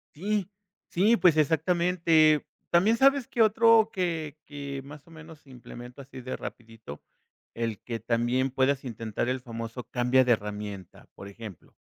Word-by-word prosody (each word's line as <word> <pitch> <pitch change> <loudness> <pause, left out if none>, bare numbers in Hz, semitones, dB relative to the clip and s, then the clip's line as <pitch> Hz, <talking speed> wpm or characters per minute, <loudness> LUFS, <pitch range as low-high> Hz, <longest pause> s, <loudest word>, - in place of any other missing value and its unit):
Sí. 200 +2 -2 0.4
Sí, 215 +6 +3
pues, 175 -4 +4
exactamente. 160 -1 +3 0.2
También 195 +7 +4
sabes 275 0 +3
que 235 - -1
otro 225 0 +5
que 165 -5 -3
que, 140 -2 -6
más 145 0 -12
o - - -17
menos, 160 -1 -13
si 140 - -23
implemento 125 +1 -11
así 130 -1 -11
de 130 +1 -5
rapidito, 115 -10 -10 0.5
el 115 -3 -3
que 115 -2 -5
también 120 +3 0
puedas 135 +1 0
intentar 115 -1 -4
el 130 0 -2
famoso 115 0 -7
"Cambia 125 +1 +3
de 125 - +1
herramienta". 105 -3 -6
Por 100 - -10
ejemplo, 100 -3 -11
135 Hz, 150 wpm, -27 LUFS, 115-170 Hz, 0.5 s, otro